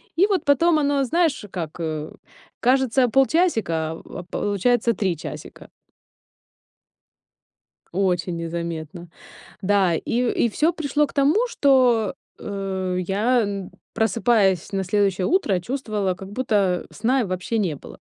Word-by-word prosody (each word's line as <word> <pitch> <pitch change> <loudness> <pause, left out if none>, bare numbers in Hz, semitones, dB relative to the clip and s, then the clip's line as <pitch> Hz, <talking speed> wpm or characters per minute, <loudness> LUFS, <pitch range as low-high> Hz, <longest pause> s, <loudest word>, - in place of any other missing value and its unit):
И 365 - +5
вот 395 -3 0
потом 310 +3 +4
оно, 285 -1 +1
знаешь, 310 -3 0
как, 165 -3 -6
э, 155 -2 -4 0.5
кажется, 260 0 +3
полчасика, 225 - +1
а 165 - -10 0.2
а, - - -7
получается 210 +6 0
3 190 -4 -1
часика. - - -9 2.2
Очень 180 -2 0
незаметно. 170 0 -5 0.5
Да, 190 -3 +2
и 240 +8 -1 0.2
и - - +1
всё 310 +9 +1
пришло 300 -2 0
к - - -15
тому, 305 - +3
что, 250 - +3 0.2
э, 190 -2 -3
я, 225 +7 +2
н 200 -3 -4 0.2
просыпаясь 215 -4 +2
на 195 -1 -1
следующее 195 -1 +1
утро, 225 - +1
чувствовала, 215 -3 -2
как 190 +2 -10
будто 205 -6 0
сна 250 +5 +1
и - - 0
вообще 185 +4 -3
не 185 -8 0
было. - - -13
205 Hz, 130 wpm, -23 LUFS, 180-265 Hz, 2.2 s, И